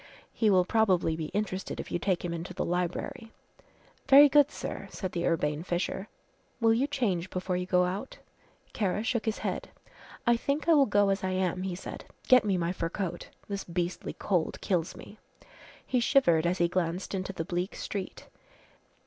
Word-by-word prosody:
He 220 - +2
will 185 -2 +4
probably 185 -7 +2
be 160 -1 -4
interested 195 -1 -3
if - - -6
you 175 - 0
take 180 -1 0
him 170 - -2
into 170 +2 -6
the - - -1
library." 180 +5 -3 0.8
"Very 285 +2 +9
good, 290 0 +5
sir," - - -6
said 185 -2 -5
the 170 -1 -1
urbane 150 -2 0
Fisher, 180 +3 -2 0.5
"will 225 -1 +4
you 255 +5 +1
change 200 -11 -1
before 185 0 -2
you 180 0 -2
go 180 -1 +3
out?" 190 +8 -4 0.6
Kara 205 -1 0
shook 230 0 -1
his 220 -1 -1
head. - - -3 0.6
"I 240 -1 +5
think 280 +6 -2
I 335 - +6
will 285 -3 +5
go 205 -1 +3
as 195 -1 0
I 190 - 0
am," 185 -1 0
he 185 -1 -3
said. 180 - -8 0.2
"Get 255 -2 +7
me 200 -3 +1
my 170 0 0
fur 165 -2 -3
coat. 175 -2 -4 0.2
This 200 -1 -4
beastly 175 +1 -3
cold 180 -5 -1
kills 175 -4 -1
me," 215 - -12 0.7
he 250 - +1
shivered 175 - +3
as 180 +2 0
he 175 - +3
glanced 180 +1 -2
into 190 0 -2
the 165 -4 -4
bleak 180 +1 -3
street. 195 -3 -5
185 Hz, 185 wpm, -29 LUFS, 175-220 Hz, 0.8 s, Very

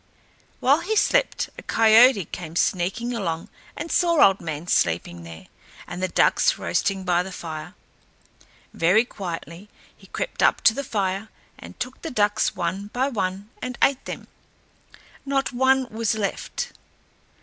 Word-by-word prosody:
While 280 +4 +4
he 415 +6 -2
slept - - +1
a - - -8
coyote 225 -2 +5
came 165 0 -8
sneaking 195 +8 0
along 170 -8 -3 0.3
and 330 +2 -5
saw 340 -3 +3
Old 195 0 +2
Man 160 -1 -5
sleeping 85 - 0
there, 85 -1 -11 0.4
and 180 - -7
the 185 - +1
ducks - - +3
roasting 195 -1 -1
by 175 -1 +2
the 190 +1 -6
fire. 160 -4 -7 1.0
Very 185 +8 +3
quietly 175 -2 -7 0.3
he - - -18
crept - - -4
up - - +3
to 220 - +5
the 280 - -4
fire 200 -3 -2 0.3
and - - -12
took 255 +1 -5
the 325 - -5
ducks 210 -4 +1
one 185 +3 -3
by 255 +6 -1
one 200 -2 -3
and 250 -1 -5
ate 275 -1 +2
them. - - -7 1.0
Not 275 -1 -1
one 260 +1 +3
was 220 0 -1
left. 205 -2 -3
205 Hz, 150 wpm, -24 LUFS, 175-255 Hz, 1.0 s, coyote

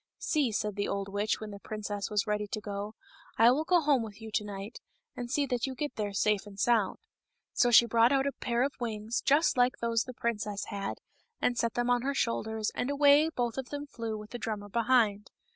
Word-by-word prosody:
" - - -63
See," 290 -7 0
said 210 -1 -2
the 200 - 0
old 200 0 -3
witch 205 +2 -1
when 215 -1 -7
the 200 - -9
princess 205 -1 -4
was 210 -2 +1
ready 210 -1 -1
to 215 - -4
go, 205 0 -5 0.2
" - - -25
I 230 +2 +7
will 290 +5 +1
go 355 +1 +4
home 285 -4 +3
with 215 -2 -8
you 220 -1 -9
to 210 - 0
night, 205 +2 -7 0.3
and 245 -1 -5
see 285 +3 +1
that 250 -1 -1
you 265 - -5
get 295 +3 -4
there 205 -2 -2
safe 210 0 +1
and 200 -1 -11
sound." 220 -2 +2 0.6
So 245 - +3
she 235 0 +8
brought 230 +1 +4
out 270 -1 +2
a 280 - +1
pair 240 -2 -1
of 275 +1 -1
wings, 225 -1 -2
just 290 0 +3
like 245 +1 +3
those 230 -1 0
the 255 - -9
princess 210 -4 -2
had, 200 -1 -4 0.4
and 245 - +1
set 230 -1 -1
them 245 0 +1
on 245 -1 +3
her 275 +2 -1
shoulders, 220 -3 -1
and 250 - -2
away 285 +2 +5
both 245 -5 -2
of 260 - -6
them 290 0 -5
flew 230 -5 -5
with 210 0 -10
the 240 - -5
drummer 205 -2 -4
behind. 225 -2 +2
230 Hz, 235 wpm, -30 LUFS, 210-250 Hz, 0.6 s, she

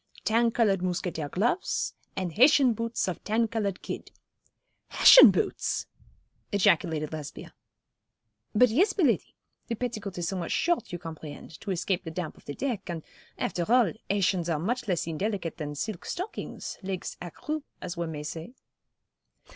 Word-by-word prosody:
Tan 230 +1 +3
coloured 215 -5 +2
mousquetaire 175 -4 -2
gloves, 240 - 0 0.2
and 180 -3 -3
Hessian 260 - +6
boots 230 -1 -2
of 185 - -4
tan 225 +2 +1
coloured 210 -4 -2
kid.' - - -6 0.8
'Hessian - - +9
boots!' - - 0 0.7
ejaculated 160 -6 +2
Lesbia. 150 -2 -7 1.0
'But, 250 +3 +6
yes, 370 - +3
Miladi. 300 - +1 0.3
The 230 - -2
petticoat 215 -5 -4
is 175 -1 -2
somewhat 180 -3 -3
short, 345 - +1
you 175 - -3
comprehend, 160 -3 -9
to 205 - -7
escape 185 0 -1
the 165 - -5
damp 160 -1 -4
of - - -20
the 145 - -6
deck, 240 -9 -3
and, 165 -2 -4 0.3
after 175 +4 -2
all, 245 -3 +5 0.2
Hessians 190 -3 +1
are 160 - +1
much 230 +10 -2
less 180 -5 0
indelicate 175 +1 -2
than 150 -2 -5
silk 200 +4 -4
stockings, 370 +5 -5
legs 190 -2 -4
à 175 - -6
cru, 310 - -4 0.2
as 180 -1 -5
one 170 -1 -3
may 150 -1 -5
say.' 165 +9 -7
190 Hz, 155 wpm, -28 LUFS, 170-230 Hz, 1.0 s, Hessian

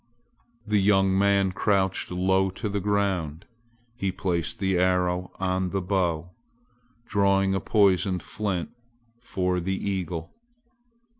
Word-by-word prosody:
The 105 -1 +2
young 95 -1 +3
man 100 -1 +3
crouched 95 0 0
low 95 +1 +1
to 100 +4 -5
the 100 0 -1
ground. 95 -5 -1 0.5
He 100 -5 -2
placed 90 -3 -2
the 95 -2 0
arrow 90 0 +1
on 95 0 0
the 95 - -1
bow, 90 -3 -1 0.7
drawing 100 -2 +2
a 95 - +1
poisoned 95 -3 +2
flint 100 -5 -3 0.5
for 90 -6 -1
the 95 +2 -2
eagle. 90 -5 -4
95 Hz, 120 wpm, -26 LUFS, 90-100 Hz, 0.7 s, young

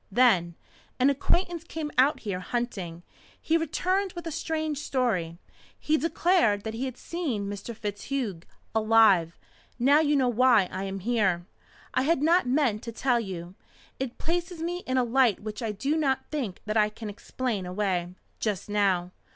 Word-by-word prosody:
Then 190 -8 +4 0.4
an 265 +3 +5
acquaintance 345 +4 0
came 320 -2 -5
out 270 +4 +4
here 200 -4 -3
hunting. 185 -6 -4 0.4
He 320 - 0
returned 365 +4 0
with 345 -1 -7
a 330 - -3
strange 310 -1 -2
story. 205 - -1 0.4
He 305 - +1
declared 330 - +2
that 220 - -4
he 240 +4 -3
had 260 -2 -5
seen 275 - -3
Mr. 205 +3 -6
FitzHugh 210 -1 -3 0.3
alive. 215 -7 +4 0.4
Now 275 +5 +5
you 295 -2 +3
know 265 -3 +3
why 240 -4 +4
I 190 +1 -3
am 195 0 -5
here. 190 -6 +1 0.5
I - - +2
had 290 +1 +2
not 335 -2 +4
meant 250 -5 +2
to 235 - -6
tell 245 +1 +1
you. 180 -5 -6 0.5
It 260 -2 -4
places 345 +1 -2
me 350 +1 -2
in 260 0 0
a 255 - +4
light 245 -2 +3
which 215 +2 -6
I 225 -2 -1
do 275 +9 -1
not 275 -4 +1
think 255 -12 -3
that 215 +1 -1
I 210 -1 +4
can 215 +1 -8
explain 210 -1 -3
away 180 -2 -1 0.2
just 205 -2 -2
now. 190 -4 +1
240 Hz, 165 wpm, -27 LUFS, 200-295 Hz, 0.5 s, an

